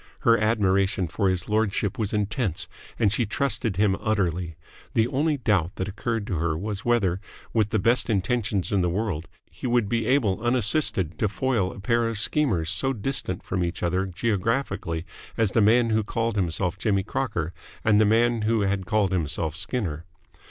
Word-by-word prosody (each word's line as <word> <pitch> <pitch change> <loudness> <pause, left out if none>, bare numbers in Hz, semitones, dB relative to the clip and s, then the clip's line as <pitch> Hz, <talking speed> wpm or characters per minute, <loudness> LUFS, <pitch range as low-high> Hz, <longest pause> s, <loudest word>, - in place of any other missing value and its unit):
Her 115 - +5
admiration 100 -4 +1
for 100 +3 0
his 90 -2 -1
lordship 105 -1 0
was 105 -3 -1
intense, 105 - -1 0.3
and 105 -3 +2
she 115 +1 0
trusted 120 -3 -1
him 100 -2 +3
utterly. 90 -6 -1 0.4
The 110 0 +3
only 145 +3 0
doubt 100 - +1
that 95 - -3
occurred 110 +2 -3
to 95 -5 -2
her 80 0 0
was 105 +3 -4
whether, 100 -7 +1 0.3
with 110 -2 +2
the 110 - +1
best 115 +5 +2
intentions 105 -1 0
in 100 -2 +2
the 90 - +1
world, 90 -3 -2 0.2
he 105 +9 -5
would 120 -3 +2
be 115 +1 -1
able 115 -8 +2
unassisted 120 - +1
to 105 - +1
foil 110 -4 0
a - - -10
pair 115 +3 +1
of 115 - -4
schemers 100 - +1
so 135 +9 +2
distant 105 -5 -2
from 90 -1 -1
each 85 +1 -3
other 90 +3 0
geographically 100 -3 -1 0.3
as 110 -4 +2
the 115 - +3
man 115 +2 +4
who 110 0 +2
called 115 +1 -2
himself 90 -1 -1
Jimmy 100 -1 +1
Crocker 100 -8 -2 0.3
and 105 -1 +5
the - - +5
man 115 +2 +3
who 110 0 +1
had 95 -2 -1
called 105 -3 +2
himself 80 -3 -1
Skinner. 85 - -3
105 Hz, 180 wpm, -25 LUFS, 95-115 Hz, 0.4 s, Her